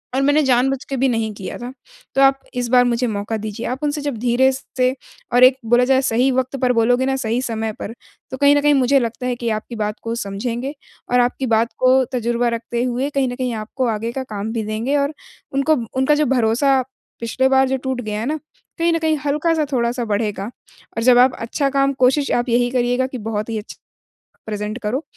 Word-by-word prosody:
और 270 - +2
मैंने 290 +2 +4
जानबूझ 265 +1 +2
के 275 - -2
भी 265 +2 +2
नहीं 225 -2 -1
किया 195 -2 -7
था, 245 +1 -7 0.4
तो 270 - +3
आप 270 0 +5 0.2
इस 245 -1 -1
बार 250 0 +5
मुझे 245 0 +1
मौका 210 +1 -3
दीजिए।" 215 +1 -5
आप 255 +2 -3
उनसे 295 0 -1
जब 285 -5 -3
धीरे 245 +3 +3
स 265 +1 -7
से 255 +1 +2 0.4
और 250 +1 +5
एक 255 +1 +7
बोला 240 +2 +4
जाए 265 0 +3
सही 250 +1 +2
वक़्त 260 +1 -1
पर 250 -1 +3
बोलोगे 245 +3 +2
ना 270 - 0
सही 240 -2 -1
समय 225 -3 -3
पर, 225 - -5 0.4
तो 260 - -4
कहीं 285 +1 +5
न 290 - +3
कहीं 295 0 +4
मुझे 270 0 +4
लगता 240 +1 -3
है 245 - 0
कि 235 -1 -3
आपकी 215 +2 -4
बात 210 -1 -2
को 230 - -3
समझेंगे 235 +6 -4 0.4
और 245 - +4
आपकी 245 +2 +1
बात 225 +1 +1
को 260 +1 +5
तजुर्बा 240 0 0
रखते 235 +1 -2
हुए 255 +3 -1
कहीं 275 -2 0
न 245 - -5
कहीं 255 -2 -2
आपको 225 +4 -3
आगे 225 +1 -2
का 265 +1 -4
काम 215 -2 -5
भी 225 -2 -2
देंगे 225 +7 -1
और 280 +2 0 0.4
उनको 275 +3 +2 0.2
उनका 265 +3 +3
जो 300 0 +2
भरोसा 260 +2 +2 0.4
पिछले 260 +3 +1
बार 265 0 +4
जो 265 - +1
टूट 260 -1 -3
गया 215 -2 -4
है 225 - -3
ना, 305 +4 -2 0.4
कहीं 335 0 +2
न - - +2
कहीं 315 -1 +1
हल्का-सा 305 +2 +1
थोड़ा-सा 240 0 0
बढ़ेगा 210 0 -2 0.5
और 230 - 0
जब 245 0 +6
आप 255 +1 +5
अच्छा 275 +5 -1
काम 275 0 +1
कोशिश 280 +2 +2
आप 240 +1 0
यही 245 +1 +2
करिएगा 250 +1 +1
कि 255 - -6
बहुत 215 0 -4
ही 225 - -2
अच्छा 210 - -9 0.7
प्रेज़ेंट 210 +1 -4
करो। 245 +8 -1
250 Hz, 225 wpm, -20 LUFS, 230-270 Hz, 0.7 s, एक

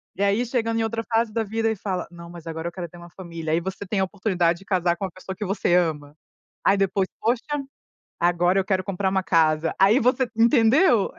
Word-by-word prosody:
E 195 - -5
aí 200 +5 +2
chegando 230 -2 -1
em 225 - +1
outra 225 +1 -2
fase 225 0 +2
da 225 - 0
vida 225 +1 -1
e - - -2
fala: 190 -2 -3
"Não, 170 -1 -11
mas 170 -1 -11
agora 165 0 -5
eu - - -4
quero 175 -1 -6
ter 175 - -14
uma 175 0 -12
família", 165 -3 -5
aí 165 - +3
você 190 +3 -5
tem 200 0 -1
a - - +3
oportunidade 180 -4 0
de 195 - -16
casar 180 -3 +1
com 195 - -3
uma 185 - -6
pessoa 190 +1 -8
que 210 - -4
você 190 -2 0
ama. 150 -4 0 0.5
Aí 195 - +4
depois, 195 -1 +1
"Poxa, 235 +1 +1 0.8
agora 175 +2 +2
eu 190 - -1
quero 190 -1 0
comprar 195 0 -1
uma 190 0 0
casa", 160 -2 +2
aí 205 +7 +5
você 250 +1 +2
entendeu? 235 - +4
190 Hz, 230 wpm, -24 LUFS, 175-225 Hz, 0.8 s, aí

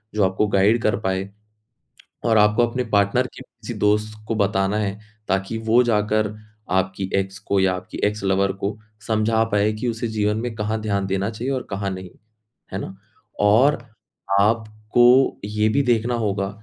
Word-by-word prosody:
जो 105 - +2
आपको 95 +3 +1
गाइड 100 +4 +3
कर 105 - +2
पाए 95 0 -2 1.0
और 115 -2 +3
आपको 105 +3 +4
अपने 125 +2 -2
पार्टनर 100 0 +2
के - - -13
किसी - - -9
दोस्त 105 +1 +1
को 115 - -1
बताना 100 0 +1
है, 100 0 -2 0.3
ताकि 95 +3 -1
वो 120 +2 +6
जाकर 105 -1 +1 0.4
आपकी 95 +1 0
एक्स 95 -1 -1
को 100 +1 0
या 95 -1 +3
आपकी 90 0 -8
एक्स 105 0 -2
लवर 95 0 +2
को 100 +2 -2 0.3
समझा 110 0 +2
पाए 105 +1 +3
कि 110 +3 -4
उसे 115 0 -3
जीवन 105 -1 0
में 120 -2 -3
कहाँ 110 +1 -2
ध्यान 100 -2 -1
देना 95 +2 -1
चाहिए 115 +4 -4
और 130 - -2
कहाँ 100 0 -2
नहीं। 95 -1 -7 0.6
है 95 - -2
ना? 95 - -7 0.4
और 115 +8 +4 0.6
आपको 115 +4 +3
ये 105 +1 0
भी 140 +6 +2
देखना 120 -1 +1
होगा 100 -4 -1
105 Hz, 170 wpm, -22 LUFS, 100-110 Hz, 1.0 s, वो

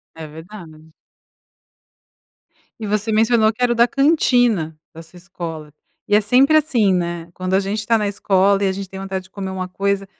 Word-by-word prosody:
É 160 -1 -8
verdade. 160 -1 -13 1.9
E 220 - -5
você 210 +2 -1
mencionou 220 0 +3
que 240 - -13
era 245 - +2
o - - +1
da 235 +1 +4
cantina 245 - +2 0.2
da 165 - -10
sua 165 +2 -16
escola. 170 -3 -8 0.4
E 205 - +3
é 210 - +4
sempre 260 +8 +4
assim 245 -11 +2
né, 170 -1 -3
quando 185 +1 -4
a 190 - +4
gente 200 +2 -3
está 225 +2 +1
na 210 -1 -1
escola 200 0 +1
e - - +2
a - - +1
gente 195 0 -6
tem 190 - -9
vontade 195 -1 -5
de 190 - -20
comer 190 -1 -6
uma 185 -1 -5
coisa 200 +1 -1
195 Hz, 195 wpm, -19 LUFS, 180-220 Hz, 1.9 s, da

